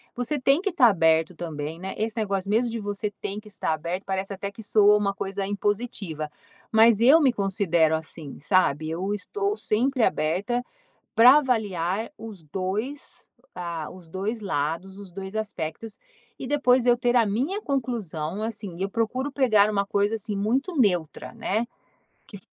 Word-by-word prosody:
você 245 Hz, +4 st, -2 dB
tem 275 Hz, +5 st, +3 dB
que 400 Hz, 0 st, -1 dB
tá 270 Hz, -8 st, +5 dB
aberto 165 Hz, -3 st, +3 dB
também, 160 Hz, -1 st, -5 dB
né? 190 Hz, +1 st, -5 dB
Esse 220 Hz, +1 st, -2 dB
negócio 200 Hz, -3 st, -1 dB
mesmo 230 Hz, +3 st, +2 dB
de 230 Hz, -, -3 dB
você 205 Hz, 0 st, -3 dB
tem 200 Hz, +1 st, -4 dB
que 215 Hz, -, -15 dB
estar 200 Hz, -5 st, -2 dB
aberto, 170 Hz, +5 st, -4 dB
parece 195 Hz, +1 st, -3 dB
até 200 Hz, +1 st, -5 dB
que 220 Hz, +2 st, -10 dB
soa 210 Hz, -1 st, +5 dB
uma 200 Hz, -1 st, 0 dB
coisa 195 Hz, 0 st, -4 dB
impositiva, 200 Hz, -6 st, -2 dB, 0.4 s
mas 225 Hz, -1 st, +6 dB
eu 275 Hz, +8 st, +7 dB
me 270 Hz, -4 st, +4 dB
considero 185 Hz, -7 st, +1 dB
assim, 160 Hz, -2 st, -8 dB
sabe? 155 Hz, -2 st, +1 dB
Eu 185 Hz, +5 st, -2 dB
estou 400 Hz, -, -2 dB
sempre 255 Hz, -, 0 dB
aberta 195 Hz, +12 st, 0 dB, 0.5 s
pra 250 Hz, +5 st, +8 dB
avaliar 215 Hz, -, -1 dB
os 215 Hz, -6 st, -10 dB
2, 195 Hz, -, -5 dB, 0.3 s
ah, 170 Hz, -3 st, -5 dB
os 180 Hz, -2 st, -13 dB
2 195 Hz, +7 st, -3 dB
lados, 185 Hz, +1 st, -3 dB
os 200 Hz, -3 st, -11 dB
2 190 Hz, +2 st, -7 dB
aspectos 215 Hz, 0 st, -5 dB, 0.4 s
e -, -, -5 dB
depois 255 Hz, -3 st, +3 dB
eu 245 Hz, -1 st, +5 dB
ter 245 Hz, 0 st, 0 dB
a 235 Hz, -2 st, +5 dB
minha 260 Hz, -, -1 dB
conclusão. 215 Hz, -, -3 dB
Assim 210 Hz, -5 st, -5 dB
eu 195 Hz, +1 st, -1 dB
procuro 245 Hz, +6 st, -1 dB
pegar 220 Hz, -7 st, +4 dB
uma 200 Hz, -1 st, 0 dB
coisa, 205 Hz, +2 st, +1 dB
assim, 210 Hz, -1 st, -4 dB
muito 260 Hz, -, -1 dB
neutra 180 Hz, -, 0 dB
né? 220 Hz, +4 st, -1 dB, 0.6 s
Que 200 Hz, -, -11 dB
205 Hz, 165 wpm, -25 LUFS, 185-235 Hz, 0.6 s, pra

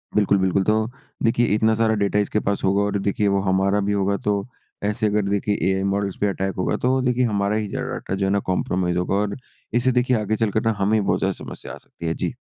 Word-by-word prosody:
बिल्कुल, 100 Hz, -1 st, +3 dB
बिल्कुल। 95 Hz, 0 st, +2 dB
तो 110 Hz, +2 st, +2 dB, 0.4 s
देखिए 115 Hz, +1 st, +3 dB
इतना 110 Hz, +1 st, +3 dB
सारा 110 Hz, 0 st, +2 dB
डेटा 100 Hz, 0 st, +1 dB
इसके 105 Hz, +1 st, 0 dB
पास 100 Hz, -1 st, -2 dB
होगा 100 Hz, +1 st, +2 dB
और 100 Hz, 0 st, 0 dB
देखिए 100 Hz, +1 st, 0 dB
वो 100 Hz, 0 st, +2 dB
हमारा 95 Hz, +1 st, +2 dB
भी -, -, +2 dB
होगा 100 Hz, 0 st, +1 dB
तो 100 Hz, -1 st, -1 dB, 0.4 s
ऐसे 105 Hz, +2 st, 0 dB
अगर 105 Hz, 0 st, +1 dB
देखिए 100 Hz, +1 st, 0 dB, 0.2 s
एआई 95 Hz, 0 st, 0 dB
मॉडल्ज़ 100 Hz, 0 st, -1 dB
पे 105 Hz, -, +3 dB
अटैक 95 Hz, -1 st, -2 dB
होगा 90 Hz, -, 0 dB
तो 130 Hz, +1 st, +1 dB
देखिए 125 Hz, 0 st, +1 dB
हमारा 100 Hz, -2 st, 0 dB
ही 110 Hz, -1 st, -1 dB
जो -, -, -4 dB
है -, -, -2 dB
डेटा 95 Hz, -, -4 dB
जो 95 Hz, 0 st, -1 dB
है 95 Hz, -, +1 dB
ना 100 Hz, -, +2 dB
कंप्रोमाइज़ 90 Hz, -1 st, 0 dB
होगा 90 Hz, +2 st, 0 dB
और 100 Hz, 0 st, -1 dB, 0.4 s
इससे 120 Hz, +2 st, +3 dB
देखिए 125 Hz, 0 st, +2 dB
आगे 105 Hz, +1 st, 0 dB
चलकर 110 Hz, -1 st, +1 dB
ना 115 Hz, -, +4 dB
हमें 100 Hz, +2 st, +2 dB
ही -, -, +1 dB
बहुत -, -, +1 dB
ज़्यादा -, -, 0 dB
समस्या -, -, -8 dB
आ -, -, -8 dB
सकती 85 Hz, -, -9 dB
है। 80 Hz, -, +1 dB
जी। -, -, -3 dB
100 Hz, 250 wpm, -22 LUFS, 95-110 Hz, 0.4 s, ना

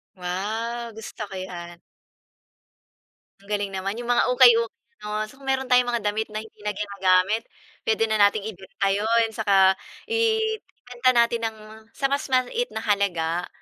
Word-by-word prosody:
Wow! 220 Hz, +6 st, -3 dB
Gusto 220 Hz, 0 st, -9 dB
ko 195 Hz, -, -8 dB
'yan. 175 Hz, -2 st, -8 dB, 1.6 s
Ang 200 Hz, -, -20 dB
galing 205 Hz, -1 st, -2 dB
naman 195 Hz, +2 st, -3 dB
yung 240 Hz, 0 st, -3 dB
mga 240 Hz, -, +3 dB
ukay-ukay 235 Hz, -3 st, +7 dB, 0.3 s
ano 210 Hz, 0 st, -3 dB
kung 270 Hz, 0 st, -15 dB
meron 265 Hz, -1 st, -1 dB
tayong 250 Hz, 0 st, +5 dB
mga 225 Hz, -, -2 dB
damit 220 Hz, +1 st, -2 dB
na 215 Hz, 0 st, -5 dB
hindi 220 Hz, -1 st, -17 dB
na 210 Hz, -1 st, -3 dB
ginagamit 200 Hz, +1 st, +1 dB, 0.4 s
puwede 225 Hz, 0 st, +2 dB
na 220 Hz, -1 st, +1 dB
nating 205 Hz, 0 st, +4 dB
ibenta 195 Hz, -1 st, -4 dB
'yon, 225 Hz, +3 st, +2 dB
'tsaka 195 Hz, -3 st, +3 dB, 0.3 s
ibenta 440 Hz, -, 0 dB
natin 235 Hz, 0 st, +3 dB
ng 220 Hz, -1 st, -8 dB, 0.4 s
sa 275 Hz, -1 st, 0 dB
mas 285 Hz, +2 st, 0 dB
maliit 260 Hz, -, +1 dB
na 220 Hz, -, -3 dB
halaga. 180 Hz, -5 st, 0 dB
220 Hz, 150 wpm, -24 LUFS, 195-240 Hz, 1.6 s, ukay-ukay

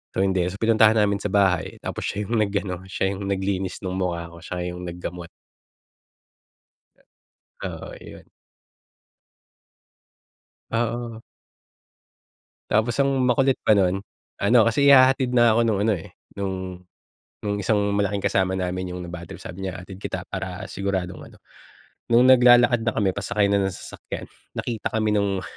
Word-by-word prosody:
So, 95 Hz, -, +2 dB
hindi. 95 Hz, -2 st, +1 dB
So, 90 Hz, -, -4 dB
pinuntahan 110 Hz, 0 st, +4 dB
namin 100 Hz, -2 st, +2 dB
sa 105 Hz, -, -2 dB
bahay. 95 Hz, -3 st, +1 dB
Tapos -, -, -4 dB
siya 105 Hz, +1 st, -2 dB
yung 115 Hz, +2 st, -1 dB
nag-ano, 100 Hz, -3 st, -2 dB
siya 95 Hz, 0 st, -1 dB
yung 100 Hz, 0 st, -5 dB
naglinis 95 Hz, -1 st, -2 dB
ng 95 Hz, 0 st, -3 dB
mukha 85 Hz, -2 st, -3 dB
ko, 85 Hz, -, -13 dB
siya 90 Hz, +1 st, -4 dB
yung 90 Hz, 0 st, -7 dB
naggamot. 85 Hz, 0 st, -6 dB, 2.4 s
Oo, -, -, -6 dB
iyon. -, -, -13 dB, 2.4 s
Oo. 115 Hz, 0 st, -2 dB, 1.5 s
Tapos 110 Hz, +3 st, +2 dB
ang 140 Hz, -, +3 dB, 0.2 s
makulit 130 Hz, +2 st, +3 dB
pa -, -, +5 dB
no'n, 95 Hz, -2 st, +3 dB, 0.5 s
ano, 120 Hz, +4 st, +5 dB
kasi 140 Hz, +5 st, +1 dB
ihahatid 130 Hz, -1 st, +5 dB
na 120 Hz, -2 st, +5 dB
ako 115 Hz, -, +3 dB
no'ng 110 Hz, -4 st, +1 dB
ano, -, -, +4 dB
eh, 80 Hz, -, -11 dB, 0.2 s
no'ng 100 Hz, -1 st, -2 dB, 0.9 s
no'ng 100 Hz, -1 st, -1 dB
isang 105 Hz, -1 st, +1 dB
malaking 100 Hz, 0 st, 0 dB
kasama 95 Hz, 0 st, +1 dB
namin, 90 Hz, -1 st, -3 dB
'yong 90 Hz, -, -6 dB
nabadtrip. 85 Hz, -1 st, -9 dB
Sabi 95 Hz, +1 st, -6 dB
niya, 90 Hz, -1 st, -5 dB
"Hatid 95 Hz, 0 st, -10 dB
kita 95 Hz, -2 st, -4 dB
para 95 Hz, +1 st, -5 dB
siguradong 95 Hz, -2 st, -3 dB
ano" -, -, -17 dB, 0.7 s
no'ng 120 Hz, +1 st, +5 dB
naglalakad 120 Hz, -1 st, +6 dB
na 115 Hz, -, +1 dB
kami, 100 Hz, -3 st, +2 dB
pasakay 100 Hz, +1 st, 0 dB
na 100 Hz, -, +3 dB
ng 95 Hz, -, -3 dB
sasakyan, -, -, -8 dB, 0.3 s
nakita 115 Hz, -3 st, -4 dB
kami 110 Hz, -1 st, +1 dB
no'ng 100 Hz, -2 st, 0 dB
100 Hz, 145 wpm, -24 LUFS, 95-110 Hz, 2.4 s, naglalakad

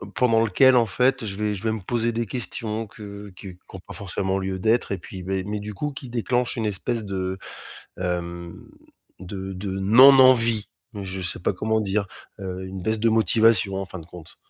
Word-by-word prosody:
pendant 115 Hz, -3 st, +3 dB
lequel, 130 Hz, +5 st, +5 dB
en 115 Hz, -, +4 dB
fait, 125 Hz, +4 st, +1 dB
je 95 Hz, -2 st, -4 dB
vais 105 Hz, 0 st, -1 dB
je 95 Hz, -, -8 dB
vais 110 Hz, -1 st, 0 dB
me 110 Hz, -, -5 dB
poser 115 Hz, +3 st, -1 dB
des 115 Hz, 0 st, -1 dB
questions 110 Hz, -1 st, -3 dB
que 100 Hz, -1 st, -10 dB
qui 95 Hz, -1 st, -10 dB
qui 95 Hz, -, -16 dB
ont -, -, -7 dB
pas -, -, -9 dB
forcément 95 Hz, -1 st, -2 dB
lieu 95 Hz, 0 st, -3 dB
d'être 110 Hz, +2 st, +1 dB
et -, -, -2 dB
puis, 90 Hz, +1 st, -9 dB
bah 95 Hz, +2 st, -3 dB
mais 105 Hz, 0 st, -3 dB
du 105 Hz, 0 st, -7 dB
coup, 150 Hz, +8 st, -3 dB
qui 135 Hz, -2 st, -9 dB
déclenchent 120 Hz, +1 st, 0 dB
une 115 Hz, -2 st, -2 dB
espèce 105 Hz, +3 st, -2 dB
de, 95 Hz, -1 st, -3 dB, 0.6 s
hem, 85 Hz, -1 st, -4 dB, 0.5 s
de 95 Hz, +1 st, -6 dB
de 95 Hz, +1 st, -4 dB
non-envie. 115 Hz, 0 st, +6 dB, 0.3 s
Je 95 Hz, -2 st, -5 dB
sais 90 Hz, -, -2 dB
pas 90 Hz, -, 0 dB
comment 110 Hz, +3 st, 0 dB
dire, 100 Hz, -1 st, -1 dB, 0.3 s
heu, 95 Hz, -1 st, -5 dB
une 95 Hz, -1 st, -7 dB
baisse 110 Hz, +2 st, 0 dB
de 115 Hz, +1 st, +2 dB
motivation, 110 Hz, -2 st, +3 dB
en 95 Hz, -, -2 dB
fin 95 Hz, -1 st, -8 dB
de 80 Hz, -, -13 dB
compte. 85 Hz, -2 st, -13 dB
105 Hz, 205 wpm, -24 LUFS, 95-115 Hz, 0.6 s, non-envie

